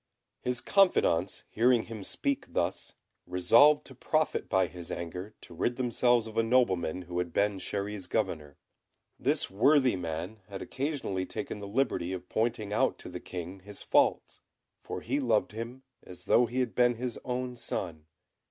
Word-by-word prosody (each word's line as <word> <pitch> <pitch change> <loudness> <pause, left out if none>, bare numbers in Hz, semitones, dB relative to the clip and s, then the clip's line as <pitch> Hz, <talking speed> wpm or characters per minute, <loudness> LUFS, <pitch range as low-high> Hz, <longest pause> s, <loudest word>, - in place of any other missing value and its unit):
His 125 0 -1
confidants 100 - +3
hearing 120 0 +3
him 110 -3 -8
speak 280 - -2
thus, 85 +2 -2 0.3
resolved 115 +12 +5
to 135 - -10
profit 155 +4 0
by 95 - +3
his 90 -2 -8
anger 90 +5 -5
to - - -12
rid 120 +8 0
themselves 120 -1 +2
of 110 -1 -9
a - - +6
nobleman 95 -8 +2
who 90 0 -4
had 90 -1 -2
been 100 +3 +1
Chéri's 100 -1 -3
governor. 80 -9 -2 0.6
This - - 0
worthy 130 +4 +4
man 90 +4 -5
had 100 -1 -6
occasionally 130 -10 -3
taken - - -5
the 100 - -7
liberty 100 -6 0
of 90 -1 -7
pointing 110 -2 -1
out - - +2
to - - -9
the - - -6
King 90 +1 -7
his 100 +2 -9
faults, - - +2 0.4
for - - -6
he 135 +5 -1
loved 115 -6 +1
him 115 +4 -7 0.2
as 90 - -12
though 120 0 +4
he 125 +3 -1
had 125 -3 -2
been 120 -1 +3
his 120 0 -4
own 125 0 -3
son. 80 -9 -5
110 Hz, 165 wpm, -30 LUFS, 90-125 Hz, 0.6 s, a